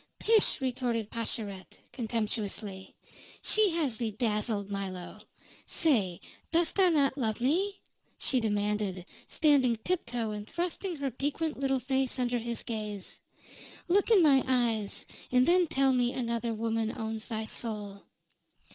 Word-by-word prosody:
"Pish!" 445 -6 +5
retorted 245 -4 -1
Pascherette, 215 -4 -4 0.2
contemptuously. 215 -4 -3 0.5
"She 430 -1 +5
has 285 -9 -1
thee 230 -1 -1
dazzled, 210 -2 -1
Milo. 190 -3 -5 0.5
Say, 210 - +2 0.3
dost 335 0 +2
thou 380 -2 +4
not 285 -4 +2
love 220 -4 -1
me?" 365 +11 0 0.4
she 260 - +2
demanded, 205 -4 -1 0.2
standing 280 -6 +3
tiptoe 235 -4 -2
and 210 0 -6
thrusting 355 +1 -3
her 280 -3 -3
piquant 290 +4 -2
little 270 -1 +1
face 265 +1 0
under 245 -1 0
his 235 0 -3
gaze. 210 -4 -5 0.7
"Look 390 +5 +3
in 415 -6 +6
my 275 -4 +5
eyes, 235 -5 0 0.3
and 250 0 +4
then 355 0 +4
tell 270 -2 +2
me 245 -1 +2
another 235 -1 -2
woman 225 0 -2
owns 220 -1 -4
thy 220 -2 -3
soul!" 210 -3 -3
235 Hz, 130 wpm, -30 LUFS, 215-275 Hz, 0.7 s, in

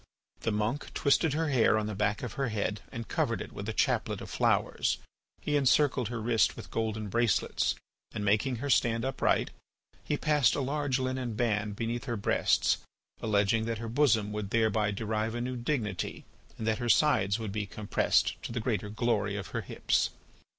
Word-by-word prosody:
The 115 - -1
monk 110 +7 -2
twisted 145 +1 +3
her 160 +1 0
hair 120 -5 +4
on 110 - -1
the 105 - -3
back 105 +2 0
of 120 -5 -4
her 135 -1 -1
head 105 -1 -2
and 115 -1 -6
covered - - 0
it - - -7
with - - -6
a - - 0
chaplet - - 0
of - - -8
flowers. - - +1 0.4
He 150 - -1
encircled 135 -3 +3
her 120 +1 -4
wrist 115 0 +2
with - - -10
golden 110 -1 -2
bracelets 115 0 +1 0.4
and 105 - -4
making 110 +6 +2
her 135 +5 -4
stand 115 0 +2
upright, 135 0 +1 0.5
he 145 - -1
passed 150 -5 +3
a - - -1
large 140 0 0
linen 130 -3 -2
band 105 -3 0
beneath 115 +3 -3
her 120 -3 -2
breasts, 100 - +2 0.4
alleging 110 +1 +2
that 115 0 -2
her 115 +1 -5
bosom 115 -4 +2
would 105 -2 -4
thereby 110 -2 +2
derive 110 +2 -2
a - - -2
new 125 +1 -3
dignity 120 - -3 0.3
and 110 - -4
that 110 +1 +1
her 120 -1 -2
sides 115 -9 +4
would 110 -3 -4
be 105 0 -3
compressed 105 +1 +1
to - - -6
the 120 - -2
greater 110 -2 -1
glory 105 -2 0
of 100 -3 -5
her - - -3
hips. - - 0
115 Hz, 185 wpm, -30 LUFS, 105-130 Hz, 0.5 s, hair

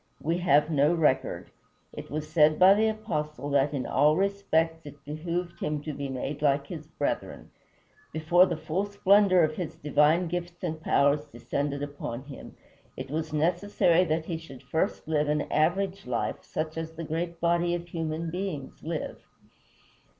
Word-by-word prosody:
We 165 +3 -1
have 150 -2 +3
no 150 +3 +3
record. 150 -5 0 0.4
It - - -8
was 150 +3 -4
said 155 -1 +4
by 185 +1 +8
the 215 +2 +2
Apostle 150 - -3
that 140 0 +3
"in 140 -3 -3
all 150 +3 +3
respects 165 -4 0
it 145 -1 -13
behooved 170 +4 -4
him 150 0 -2
to 155 - -4
be 140 -1 -5
made 135 +3 -4
like 140 -1 +2
his 155 0 -8
brethren." 145 -2 -4 0.6
Before 170 +4 +4
the 170 - -2
full 185 +6 -2
splendor 200 -2 +4
of 155 0 0
his 175 -4 -4
divine 150 +4 +3
gifts 175 +1 -5
and 160 0 -3
powers 145 -1 +2
descended 145 -1 -3
upon 140 -4 -5
him, 140 -1 -11 0.4
it - - -6
was 155 0 -2
necessary 175 +2 +2
that 160 0 -1
he 165 -1 -3
should 135 -6 -12
first 160 +2 -2
live 150 -2 +1
an 150 0 +1
average 190 +4 0
life, 120 -2 -2
such 155 0 -4
as 160 0 -6
the 165 +1 -6
great 165 +2 -3
body 170 +1 +2
of 175 0 -6
human 165 0 -3
beings 180 -7 -5
live. 160 0 -5
160 Hz, 165 wpm, -28 LUFS, 150-175 Hz, 0.6 s, by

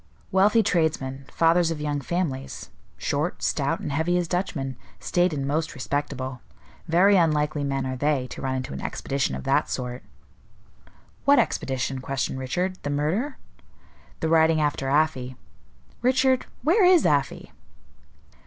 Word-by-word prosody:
Wealthy 210 +4 +4
tradesmen, 150 -8 -1
fathers 165 +1 +3
of 165 -2 -3
young 145 -1 -2
families, 140 -4 -3 0.3
short, - - -2
stout, - - 0
and - - -4
heavy 160 +5 +1
as 175 -1 -1
Dutchmen, 155 -7 -2 0.2
staid 175 0 +1
and 140 -3 -3
most 155 +2 -1
respectable. 130 -2 -3 0.5
Very 190 +5 +5
unlikely 150 -3 +1
men 135 -1 -1
are 130 0 -3
they, 145 -1 0
to - - -7
run 130 -1 -1
into 130 - -4
an 70 - -6
expedition 135 - -2
of 65 - -6
that - - +1
sort." 125 0 -4 1.2
"What 280 0 +5
expedition?" 135 - 0
questioned 135 0 -2
Richard. 180 +8 -2
"The 145 - -4
murder?" 170 - -1 0.8
"The 160 - 0
riding 160 0 +4
after 145 -3 0
Afy. 135 -4 +1 0.7
Richard, 260 +1 +2 0.2
where 365 +8 +4
is 360 -2 +6
Afy?" 145 -2 0
150 Hz, 140 wpm, -25 LUFS, 135-175 Hz, 1.2 s, is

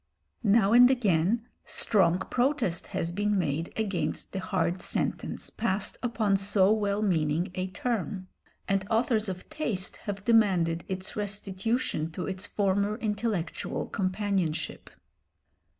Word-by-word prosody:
Now 210 -1 +4
and 245 +1 +8
again 220 -2 +2 0.2
strong 180 -5 +2
protest 240 - 0
has 165 - -2
been 205 +3 0
made 165 -2 -1
against 185 -8 -2
the 190 - -3
hard 180 -2 -1
sentence - - -1
passed 210 -2 -1
upon 220 -5 +1
so 195 0 +4
well 210 -1 +1
meaning 170 -1 +1
a 185 0 -2
term, 195 -2 -3 0.4
and 195 -1 +1
authors 225 -2 +1
of 185 -1 -6
taste 210 -12 -2
have 200 -1 -6
demanded 185 -8 +3
its 190 +1 -3
restitution 205 -3 -2
to 180 - -4
its 190 0 -4
former 200 +1 +1
intellectual 210 -6 -2
companionship. 190 -4 -2
195 Hz, 120 wpm, -28 LUFS, 185-215 Hz, 0.4 s, and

